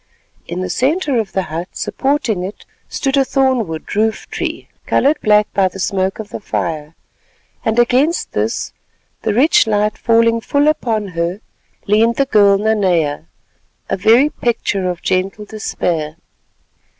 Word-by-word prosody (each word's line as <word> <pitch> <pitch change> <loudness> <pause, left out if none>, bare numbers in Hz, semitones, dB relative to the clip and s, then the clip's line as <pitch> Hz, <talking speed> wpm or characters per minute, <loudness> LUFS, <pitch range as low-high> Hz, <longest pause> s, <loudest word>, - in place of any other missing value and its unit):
In 175 +2 -4
the 185 - -3
centre 280 - +1
of 215 -3 -4
the 190 - 0
hut—supporting 205 - -2
it—stood 270 +7 -4
a 275 - +5
thorn 260 -4 +1
wood 160 +4 -6
roof 220 +1 0
tree - - -4 0.2
coloured 295 +3 +2
black 210 -2 +3
by 195 -2 +3
the 185 - -8
smoke 190 0 -1
of 215 -2 -7
the - - -6
fire; 160 -6 -4 0.7
and 225 +1 0
against 255 +8 +2
this, - - -2 0.5
the - - 0
rich 265 0 +4
light 210 0 0
falling 230 0 +3
full 285 +5 +1
upon 225 -9 0
her, 170 +2 -2 0.5
leaned 225 +3 +3
the 275 - +2
girl 205 -6 +4
Nanea—a 185 -8 -2
very 230 +9 +4
picture 205 -8 -1
of 175 -1 -5
gentle 190 +3 -1
despair. 165 -7 -3
210 Hz, 140 wpm, -17 LUFS, 185-240 Hz, 0.7 s, a